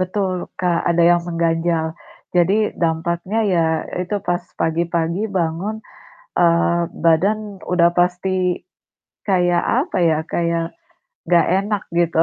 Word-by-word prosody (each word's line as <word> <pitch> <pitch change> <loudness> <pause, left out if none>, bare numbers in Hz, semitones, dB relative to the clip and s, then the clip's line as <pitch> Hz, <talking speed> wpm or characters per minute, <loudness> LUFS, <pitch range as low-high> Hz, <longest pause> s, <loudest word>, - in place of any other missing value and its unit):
Betul, 185 -1 -2
Kak, 175 -2 +1
ada 170 0 +3
yang 175 0 +4
mengganjal. 165 -1 0 0.5
Jadi, 180 +4 +3 0.2
dampaknya 170 +5 0
ya 165 -2 +3 0.4
itu, 205 +3 -2
pas 175 0 +1 0.2
pagi-pagi 170 +2 0 0.2
bangun, 170 +6 -2 0.6
eee, 170 0 +3 0.2
badan 180 +6 +3 0.3
udah 170 -1 +4
pasti 180 +1 0 0.7
kayak 175 -2 +2 0.2
apa - - -4
ya, 155 - +2 0.2
kayak 170 -1 0 0.6
nggak 175 -1 +4
enak 205 0 -2 0.2
gitu. 165 -1 +3
175 Hz, 115 wpm, -20 LUFS, 170-185 Hz, 0.7 s, yang